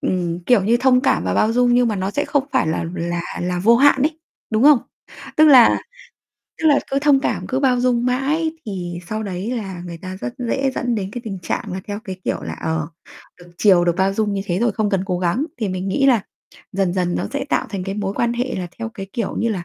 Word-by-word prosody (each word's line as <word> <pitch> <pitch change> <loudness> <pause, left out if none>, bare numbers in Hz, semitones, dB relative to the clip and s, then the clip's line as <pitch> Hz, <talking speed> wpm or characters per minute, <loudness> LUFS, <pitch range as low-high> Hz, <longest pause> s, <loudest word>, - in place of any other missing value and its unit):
ừm, 175 -2 -1
kiểu 245 -6 +4
như, 230 +3 +3
thông 250 0 +4
cảm 170 - +1
và 90 0 -1
bao 220 - +2
dung 245 0 +3
nhưng 245 -1 +3
mà 215 - -1
nó 190 +1 -2
sẽ 290 +7 -1
không 285 -2 0
phải - - +2
là 160 - -1
là 170 -1 -2 0.2
là 180 0 -1
vô 225 +6 +5
hạn 270 +1 +5
ấy, 310 +2 0 0.3
đúng 220 +1 +1
không? 290 -2 +7 0.6
Tức 310 - +6
là 260 -6 +7 0.8
tức 320 - +3
là 285 -2 +5
cứ 275 - +1
thông 280 -1 +4
cảm, - - -2
cứ 260 +1 -1
bao 255 -3 +2
dung 245 -1 +1
mãi 290 +6 0
thì 175 -4 -5
sau 215 0 -3
đấy 195 +1 -4
là 190 -5 -6
người 170 -1 -7
ta 185 +1 -7
rất 240 - -5
dễ 265 +2 0
dẫn 245 -1 -1
đến 195 -3 -3
cái 245 - -5
tình 195 -3 -5
trạng - - -3
là 190 - -4
theo 205 +1 -4
cái 190 -3 -6
kiểu - - -2
là, - - -5
ờ, 160 -2 -2 0.5
được 175 0 -15
chiều, 185 -4 +5
được 175 -1 +1
bao 190 +1 +1
dung 210 0 0
như 195 - -2
thế 175 -2 -1
rồi 235 0 +1
không 210 0 -1
cần 195 -3 +1
cố 180 -2 -1
gắng. 180 +10 0
Thì 215 -4 -1
mình 185 +1 -3
nghĩ 275 +8 +2
là 235 -7 +3 0.5
dần 190 -2 0
dần 180 -2 0
nó - - -2
sẽ 280 -1 -2
tạo - - 0
thành 195 -3 -4
cái 195 0 -4
mối 200 -1 -3
quan 235 +2 0
hệ 245 +2 -2
là 185 -1 -3
theo 230 0 -3
cái 195 -3 -8
kiểu 230 -4 -3
như 230 - +1
là, 190 -6 -3
215 Hz, 255 wpm, -20 LUFS, 185-250 Hz, 0.8 s, không